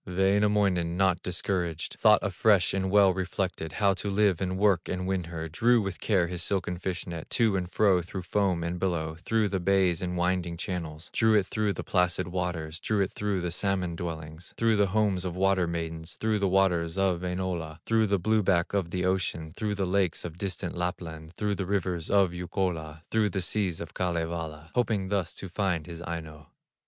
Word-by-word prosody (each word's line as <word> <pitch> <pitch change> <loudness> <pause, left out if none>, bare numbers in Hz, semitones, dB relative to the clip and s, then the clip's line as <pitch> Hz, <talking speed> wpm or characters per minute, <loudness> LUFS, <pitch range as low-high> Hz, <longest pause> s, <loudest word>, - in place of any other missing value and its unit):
Wainamoinen, 95 -2 +2
not 95 -2 +2
discouraged, 90 -2 -2
Thought 105 -1 +5
afresh 100 0 +3
and 95 -1 0
well 100 -1 +5
reflected, 90 -3 -3
How 100 -2 +3
to 100 +2 -3
live, 100 -3 +2
and 95 0 -1
work, 95 -4 +2
and 90 0 -2
win 95 -2 -1
her; 80 -1 -5
Drew 115 +9 +3
with 95 -3 -3
care 95 -5 +2
his 90 0 -3
silken 90 -1 -1
fish 90 0 -3
net, 85 -2 -7
To 110 -4 +2
and 90 -1 -2
fro 95 -4 +4
through 90 +2 -6
foam 95 -3 0
and 85 +1 -3
billow, 85 -4 -1
Through 110 +2 +1
the 95 0 -1
bays 95 -2 +2
and 90 -1 -2
winding 90 -1 0
channels, 80 -3 -5
Drew 110 0 +4
it 100 -3 +4
through 105 0 -1
the - - -5
placid 90 -1 +1
waters, 85 -3 -3
Drew 105 +2 0
it 95 - 0
through 100 -3 -2
the 90 -1 -2
salmon 90 -2 0
dwellings, 80 -1 -7
Through 115 -1 +3
the 100 -1 +4
homes 100 -2 +1
of 90 -2 -4
water 95 -1 +2
maidens, 80 0 -4
Through 110 -1 0
the 100 - +2
waters 90 -3 +2
of 95 -3 +1
Wainola, 90 -3 -3
Through 110 -1 +3
the 100 0 +2
blue 110 +4 +2
back 90 -3 +1
of 95 -4 0
the 90 +1 -1
ocean, 90 -4 -1
Through 105 -2 -2
the 100 -1 -1
lakes 95 -3 0
of 85 -2 -6
distant 90 -2 -3
Lapland, 85 -2 -4
Through 105 +2 -1
the 95 -2 -3
rivers 90 -4 -1
of 100 -3 +4
Youkola, 85 -3 -3
Through 110 -2 +2
the 95 0 -2
seas 95 -3 0
of 85 - -7
Kalevala, 80 -3 -3
Hoping 110 -6 0
thus 95 -4 -1
to 95 - -7
find 90 -3 -1
his 85 -1 -8
Aino. 80 -3 -7
90 Hz, 195 wpm, -28 LUFS, 85-100 Hz, -, Thought